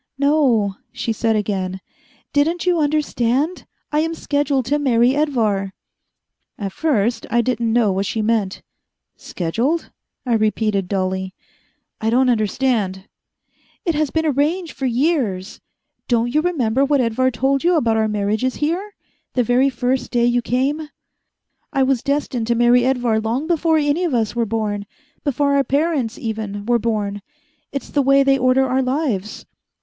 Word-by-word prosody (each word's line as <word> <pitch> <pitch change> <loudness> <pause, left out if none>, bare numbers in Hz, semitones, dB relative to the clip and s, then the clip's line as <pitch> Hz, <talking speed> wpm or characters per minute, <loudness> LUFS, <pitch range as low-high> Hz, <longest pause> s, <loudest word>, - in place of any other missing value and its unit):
"No," 270 -9 +2
she 230 - -2
said 225 0 0
again, 190 -3 -2 0.5
"didn't 325 +5 +1
you 355 -2 +2
understand? 295 0 0 0.2
I 300 - +2
am 325 +1 -1
scheduled 285 -4 0
to 290 +4 +1
marry 250 -2 +3
Edvar." 220 -10 0 0.8
At 200 -2 -4
first 235 -6 0
I 235 +2 +3
didn't 235 -1 -1
know 225 -3 +3
what 190 +1 -1
she 220 +2 -2
meant. 210 -3 0 0.5
"Scheduled?" 235 - -2 0.3
I 245 - 0
repeated 215 -3 +1
dully. 190 -1 -2 0.7
"I 220 - +1
don't 250 +2 +3
understand." 215 -4 0 0.8
"It 335 - +1
has 305 -1 0
been 320 +2 -1
arranged 310 +4 0
for 265 - -2
years. 240 - -1 0.5
Don't 240 0 +1
you 305 - +3
remember 270 -8 +1
what 285 0 +2
Edvar 255 +1 +2
told 265 +3 0
you 350 +1 +3
about 235 -8 +2
our 220 0 +2
marriages 210 +4 -1
here, 360 +7 -2 0.4
the 250 - +2
very 250 +4 +3
first 250 0 -1
day 240 -1 +2
you 240 0 +2
came? 280 +6 -1 0.8
I 270 - +2
was 260 -2 +1
destined 280 -5 -1
to 235 - +2
marry 240 +1 +4
Edvar 245 -4 +1
long 230 +7 -2
before 325 -1 +2
any 295 +3 +1
of 325 -8 0
us 225 -1 0
were 235 -1 0
born, 205 -2 -2 0.4
before 285 0 +1
our 280 - +3
parents, 280 -5 0
even, 215 -2 -4
were 240 +1 +2
born. 210 -3 -2 0.5
It's 275 - -5
the 290 - +2
way 275 +1 +4
they 270 0 +3
order 255 +1 +3
our 260 +1 +1
lives." 255 -7 -2
245 Hz, 155 wpm, -20 LUFS, 220-285 Hz, 0.8 s, marry